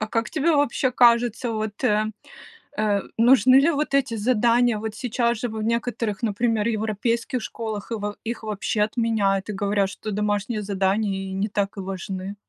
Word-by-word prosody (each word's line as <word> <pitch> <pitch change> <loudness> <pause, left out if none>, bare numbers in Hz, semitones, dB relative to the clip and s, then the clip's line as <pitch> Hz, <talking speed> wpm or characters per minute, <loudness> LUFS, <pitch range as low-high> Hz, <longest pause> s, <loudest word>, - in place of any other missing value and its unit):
А 215 - -1
как 230 +1 -2
тебе 320 +2 +1
вообще 285 -3 +1
кажется, 240 -1 +3
вот, 215 -1 -4
э, 215 +1 +2 0.7
э, 210 -2 +2 0.2
нужны 255 +2 +6
ли 280 +5 +5
вот 300 -2 -1
эти 270 -4 +2
задания? 235 0 +2
Вот 220 0 -5
сейчас 235 -1 -1
же 245 - -2
в 220 -1 -5
некоторых, 230 -3 -2
например, 225 0 0
европейских 225 +3 -1
школах, 220 -2 -5
и - - 0
во 205 -1 -4
их 230 0 -4
вообще 210 0 -1
отменяют, 210 -3 0
и - - -2
говорят, 200 0 0
что 215 - -7
домашние 210 +1 -1
задания 195 0 -1
и - - -6
не 195 +2 -1
так 205 -1 -2
и - - -2
важны. 190 +1 -5
215 Hz, 175 wpm, -23 LUFS, 205-235 Hz, 0.7 s, нужны